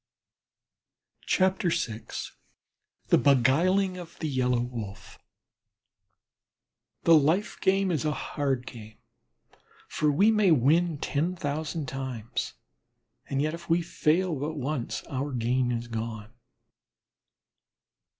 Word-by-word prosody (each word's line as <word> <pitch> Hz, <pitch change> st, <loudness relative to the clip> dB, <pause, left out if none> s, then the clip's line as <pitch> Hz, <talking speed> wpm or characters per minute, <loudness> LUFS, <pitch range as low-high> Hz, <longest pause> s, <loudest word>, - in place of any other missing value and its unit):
VI 185 Hz, 0 st, +4 dB, 1.6 s
THE -, -, +5 dB
BEGUILING 175 Hz, +9 st, +3 dB
OF 170 Hz, -2 st, -11 dB
THE 160 Hz, -, -3 dB
YELLOW 125 Hz, -3 st, +1 dB
WOLF 110 Hz, -5 st, -7 dB, 1.8 s
The 165 Hz, -, +6 dB
life 160 Hz, +7 st, +2 dB
game 195 Hz, 0 st, +2 dB
is 155 Hz, -3 st, 0 dB
a 155 Hz, -, +1 dB
hard 135 Hz, -4 st, -2 dB
game, 110 Hz, -4 st, -10 dB, 0.9 s
for 150 Hz, -1 st, +1 dB
we 200 Hz, +10 st, +4 dB
may 210 Hz, -3 st, +3 dB
win 160 Hz, +3 st, +3 dB
ten 155 Hz, +6 st, -1 dB
thousand 155 Hz, 0 st, -3 dB
times, 125 Hz, -4 st, -4 dB, 0.8 s
and 140 Hz, 0 st, 0 dB
if 165 Hz, +3 st, -4 dB
we 170 Hz, +1 st, +3 dB
fail 170 Hz, +2 st, +1 dB
but 155 Hz, +3 st, -3 dB
once 140 Hz, -3 st, -3 dB
our 140 Hz, +2 st, -3 dB
gain 125 Hz, +1 st, 0 dB
is 120 Hz, 0 st, -3 dB
gone. 110 Hz, -1 st, -5 dB
145 Hz, 100 wpm, -27 LUFS, 125-170 Hz, 1.8 s, The